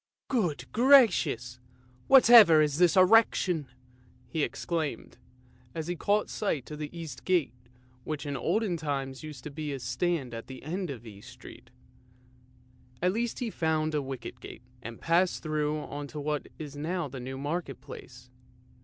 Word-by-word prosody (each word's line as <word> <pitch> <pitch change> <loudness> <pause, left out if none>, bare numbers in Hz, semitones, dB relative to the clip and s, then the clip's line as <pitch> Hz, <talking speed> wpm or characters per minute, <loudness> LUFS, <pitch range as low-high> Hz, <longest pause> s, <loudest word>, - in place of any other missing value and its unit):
" - - -65
Good 170 -9 -2
gracious! 180 - +4 0.5
Whatever 235 - +8
is 150 0 +1
that 175 -3 +4
erection? 185 -5 +4 0.3
" 125 0 -30
he 160 - 0
exclaimed, 155 -4 -3 0.6
as 160 -1 -3
he 175 +2 -3
caught 205 +5 +1
sight 155 - -3
of 150 - -7
the 150 -1 -4
East 165 -6 -8
Gate 180 -9 +1 0.5
which 150 0 -5
in 145 -1 -3
olden 190 - 0
times 135 -4 -4
used 150 -5 -9
to 150 -1 -5
stand 130 +1 -2
at 115 0 -7
the 130 -1 -10
end 180 +4 -4
of 120 -4 -7
East 105 -2 -12
Street. - - -13 1.3
At 180 +1 +1
last 235 +1 -2
he 235 -3 -3
found 155 -2 0
a 150 - +1
wicket 130 -2 -7
gate, 120 - -11 0.2
and 115 -1 -8
passed 175 +2 +1
through 155 -1 -1
on 145 -1 -6
to 150 - -8
what 150 0 -2
is 145 -3 -8
now 165 +3 -2
the 135 -1 -8
New 130 +2 -6
Market 145 -1 -4
Place. 125 -2 -12
150 Hz, 160 wpm, -29 LUFS, 135-175 Hz, 1.3 s, Whatever